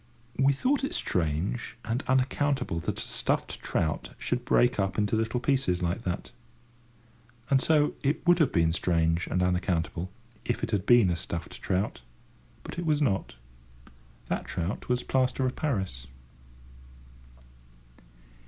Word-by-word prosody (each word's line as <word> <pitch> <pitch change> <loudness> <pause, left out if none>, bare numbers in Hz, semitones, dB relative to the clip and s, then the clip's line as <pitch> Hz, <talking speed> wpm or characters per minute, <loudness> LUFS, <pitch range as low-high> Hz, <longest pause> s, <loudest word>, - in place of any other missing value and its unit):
We 135 +1 +5
thought 265 - +1
it 275 - -1
strange 90 +10 -1
and 115 +3 -1
unaccountable 130 - +1
that - - -3
a - - -3
stuffed - - -1
trout 80 -1 -2
should 125 0 -2
break 125 -2 +3
up 95 -1 0
into 105 0 +1
little 115 +2 0
pieces 120 -9 +1
like 85 +6 -1
that. 90 -1 -3 1.2
And 135 -1 +5
so 150 -1 +3
it 145 +5 0
would 175 0 +5
have 155 -5 +4
been 80 -1 +3
strange 85 -1 +1
and 90 - 0
unaccountable, 90 -1 0 0.3
if - - -2
it - - -1
had 100 -2 -1
been 120 -7 +6
a - - +1
stuffed 85 -1 -5
trout, 95 - -1 0.6
but - - -6
it 175 - -3
was 150 -1 +3
not. 100 - 0 0.9
That - - -2
trout 90 +8 -4
was 125 0 +1
plaster 130 0 +1
of 130 - -1
Paris. 95 - -2
110 Hz, 145 wpm, -28 LUFS, 90-135 Hz, 1.2 s, been